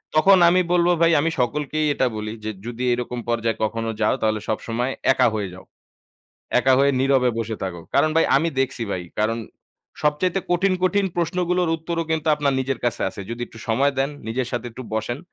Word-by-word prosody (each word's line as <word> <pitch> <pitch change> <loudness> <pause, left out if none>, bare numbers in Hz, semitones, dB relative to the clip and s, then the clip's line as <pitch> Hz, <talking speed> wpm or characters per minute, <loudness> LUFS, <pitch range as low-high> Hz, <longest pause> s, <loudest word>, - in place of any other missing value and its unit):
তখন 190 +5 +6
আমি 185 +1 +4
বলবো 175 0 +4
ভাই 165 0 +5
আমি 165 - +1
সকলকেই 150 +5 0
এটা 130 - +1
বলি 105 0 -4
যে, 110 - -1
যদি 120 +1 -5
এরকম 125 0 -3
পর্যায়ে 115 -1 0
কখনো 115 +1 -1
যাও 105 - +3
তাহলে 110 -1 +1
সবসময় 115 +3 -1 0.2
একা 130 -1 +3
হয়ে 100 -3 -2
যাও। 95 - -12 1.0
একা 135 - +3
হয়ে 140 +1 +4
নীরবে 130 -2 +3
বসে 115 -1 -3
থাকো। 90 -3 -4
কারণ 155 - +4
ভাই 165 - +5
আমি 160 +5 +2
দেখছি 130 -2 -1
ভাই। 90 - -3 0.2
কারণ 115 +2 +1 0.6
সবচাইতে 165 +6 +1
কঠিন, 185 +2 +2
কঠিন 200 +1 +2
প্রশ্নগুলোর 180 +1 0
উত্তরও 165 +1 -3
কিন্তু 160 0 -1
আপনার 145 -2 +1
নিজের 130 -1 -2
কাছে 120 -3 -1
আছে। - - -9
যদি 120 +1 -5
একটু 115 - -14
সময় 135 +5 +2
দেন, 135 +2 +1 0.2
নিজের 125 +3 -1
সাথে 120 -1 -3
একটু 125 +3 -9
বসেন 110 +3 -2
130 Hz, 190 wpm, -22 LUFS, 115-160 Hz, 1.0 s, তখন